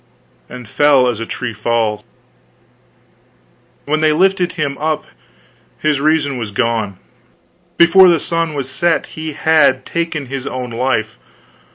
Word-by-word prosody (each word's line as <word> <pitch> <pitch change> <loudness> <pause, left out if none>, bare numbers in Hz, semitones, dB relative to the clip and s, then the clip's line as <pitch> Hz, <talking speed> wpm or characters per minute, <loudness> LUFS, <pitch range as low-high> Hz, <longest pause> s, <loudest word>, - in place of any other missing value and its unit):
and 125 -2 -10
fell 140 0 +3
as 120 -3 -2
a 115 - -5
tree 125 -2 -5
falls. 110 -1 -1 1.8
When 155 +2 0
they 155 -1 +3
lifted 185 +1 +1
him 140 -4 -2
up 155 0 -2 0.7
his 150 -2 0
reason 150 -3 +1
was 110 -3 -4
gone; 105 -2 -2 0.8
before 180 +2 +7
the 170 -2 +3
sun 165 0 -2
was 140 -2 -3
set, 165 +6 0
he 155 -1 -6
had 145 -4 +2
taken 165 -3 -3
his 135 0 -6
own 125 -1 -5
life. 115 -2 -2
140 Hz, 135 wpm, -16 LUFS, 120-160 Hz, 1.8 s, before